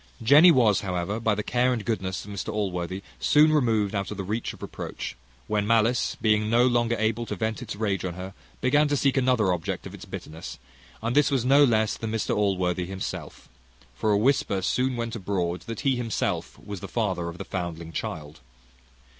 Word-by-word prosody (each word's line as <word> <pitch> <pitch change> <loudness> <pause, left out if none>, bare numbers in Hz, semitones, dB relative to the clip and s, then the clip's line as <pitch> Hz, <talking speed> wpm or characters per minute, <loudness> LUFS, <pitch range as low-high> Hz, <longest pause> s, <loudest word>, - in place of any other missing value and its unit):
Jenny 145 +9 +8
was, 115 - +4
however, 95 +2 -2
by 110 -2 +1
the 105 - -3
care 125 +3 +2
and 115 -4 -2
goodness 95 -6 -2
of 105 - -9
Mr 100 +2 -4
Allworthy, 95 -2 -3 0.2
soon 150 - +5
removed 110 -8 +2
out 100 -1 -2
of 105 - -6
the 100 - -3
reach 110 +5 -3
of - - -12
reproach; - - -6 0.3
when 105 -1 -1
malice 115 +2 +2
being 105 -1 +2
no 120 +2 +4
longer 120 -2 +2
able 110 +1 0
to - - -3
vent 110 -1 -2
its - - -6
rage 100 -2 -1
on 90 -2 -3
her, 95 +1 -7 0.3
began 145 +3 +3
to 145 0 +1
seek 135 -1 +2
another 125 -8 +3
object 80 -2 -4
of - - -8
its - - -10
bitterness, 80 +2 -8 0.5
and 115 +3 -1
this 150 0 +5
was 135 -4 0
no 140 +3 +6
less 110 -5 +2
than 110 -1 -4
Mr 110 -1 -1
Allworthy, 90 -3 0
himself; 95 0 -6 0.5
for 85 +12 -1
a 100 - +4
whisper 105 -5 +1
soon 130 +4 +1
went 115 -1 -3
abroad, 90 -4 -2
that 115 - -5
he 135 -2 +2
himself 115 -3 -2
was 100 -2 -8
the - - -7
father 95 -7 -1
of 85 - -9
the - - -6
foundling 85 -3 -5
child. 75 -1 -5
110 Hz, 200 wpm, -26 LUFS, 95-120 Hz, 0.5 s, Jenny